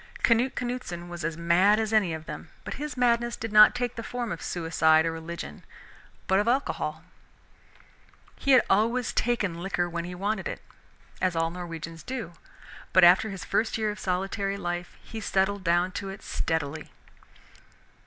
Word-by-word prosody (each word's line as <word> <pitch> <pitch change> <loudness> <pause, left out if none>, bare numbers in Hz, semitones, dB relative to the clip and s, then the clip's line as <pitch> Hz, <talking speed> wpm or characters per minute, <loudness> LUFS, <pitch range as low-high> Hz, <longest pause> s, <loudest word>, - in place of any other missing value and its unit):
Canute 240 +3 +3
Canuteson 240 -9 -4
was 175 -1 -6
as 165 0 -2
mad 180 +5 +4
as 220 0 -1
any 205 -6 +3
of 160 0 -5
them, 160 - -8
but - - -5
his 300 -2 -5
madness 240 -1 +2
did 225 -1 -5
not 215 0 +8
take 245 -1 -1
the 230 - -4
form 240 0 -4
of 170 - -5
suicide 160 -2 +2
or 165 - 0
religion 165 - -7 0.6
but 190 +1 +3
of 210 - 0
alcohol. 160 - -1 1.3
He 275 - +2
had 255 - +7
always 230 +5 +2
taken 200 -8 0
liquor 175 -1 -1
when 170 0 -4
he 180 0 -6
wanted 200 +2 -2
it, - - -6 0.6
as 185 -2 +1
all 165 0 +1
Norwegians 165 -2 -7
do, 230 -5 -5 0.6
but 185 - +6
after 180 +5 +6
his 195 -2 -7
first 225 0 0
year 215 -1 0
of 210 - -8
solitary 195 +2 -1
life 175 -1 -4
he 225 - -7
settled 195 0 0
down 175 +1 +2
to 195 +1 -5
it 195 +1 -9
steadily. 155 -1 -2
190 Hz, 170 wpm, -27 LUFS, 170-220 Hz, 1.3 s, not